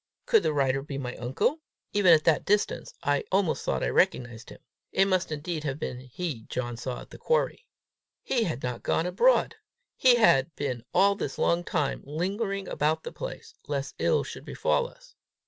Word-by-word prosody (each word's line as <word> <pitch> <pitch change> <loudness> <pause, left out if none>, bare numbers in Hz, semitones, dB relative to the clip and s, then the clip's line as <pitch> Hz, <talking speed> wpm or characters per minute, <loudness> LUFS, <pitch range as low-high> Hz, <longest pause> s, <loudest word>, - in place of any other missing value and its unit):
Could 460 -4 +5
the - - +1
rider 135 -2 +1
be 140 0 -6
my 125 -3 -4
uncle? 135 - 0 0.3
Even 200 -4 +5
at 155 -2 +6
that 160 -3 +3
distance 205 +1 0
I 145 0 +1
almost 190 -3 +1
thought - - -1
I - - +1
recognized 120 -2 0
him. - - -11 0.3
It 195 - +4
must 185 -4 0
indeed 155 +1 -3
have 135 -2 -2
been 125 -5 -4
he 130 -1 -5
John 120 -1 -3
saw 125 +2 -5
at - - -14
the - - -11
quarry! - - 0 0.6
He 235 -4 +1
was 135 -4 -5
not 125 -1 -3
gone 165 - 0
abroad! 470 - +3 0.4
He 255 -2 +5
had 155 - +4
been 130 -5 -3
all 200 +1 +5
this 200 - -4
long 170 +1 +2
time 155 -5 -1
lingering 195 +6 -2
about 155 +2 0
the - - -6
place, - - -7
lest 140 -1 -3
ill - - +2
should - - -8
befall 485 - 0
us! - - -19
155 Hz, 185 wpm, -27 LUFS, 135-200 Hz, 0.6 s, at